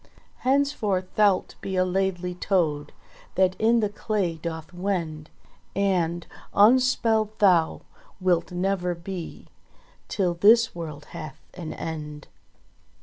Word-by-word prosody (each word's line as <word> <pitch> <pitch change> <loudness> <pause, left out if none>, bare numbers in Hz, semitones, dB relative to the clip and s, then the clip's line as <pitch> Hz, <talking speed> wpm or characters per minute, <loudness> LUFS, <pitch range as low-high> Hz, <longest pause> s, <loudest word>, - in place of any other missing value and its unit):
Henceforth 250 -9 0
thou'lt 205 -3 +3
be 190 - -4
a 185 0 +3
Laidly 180 -1 -1
Toad 165 -5 0 0.4
That 185 0 +3
in 230 +1 +4
the 210 - +1
clay 205 -4 -1
doth 160 +1 -6
wend, 170 -5 -3 0.5
And 175 -4 0 0.3
unspelled 220 -1 +4
thou 180 -6 +3 0.4
wilt 180 -2 +1
never 180 -1 -1
be 170 0 -7 0.6
Till 185 -4 0
this 225 +6 +5
world 155 -4 -7
hath 155 0 -7
an 165 -3 -6
end." 150 -2 -6
185 Hz, 110 wpm, -25 LUFS, 170-205 Hz, 0.6 s, this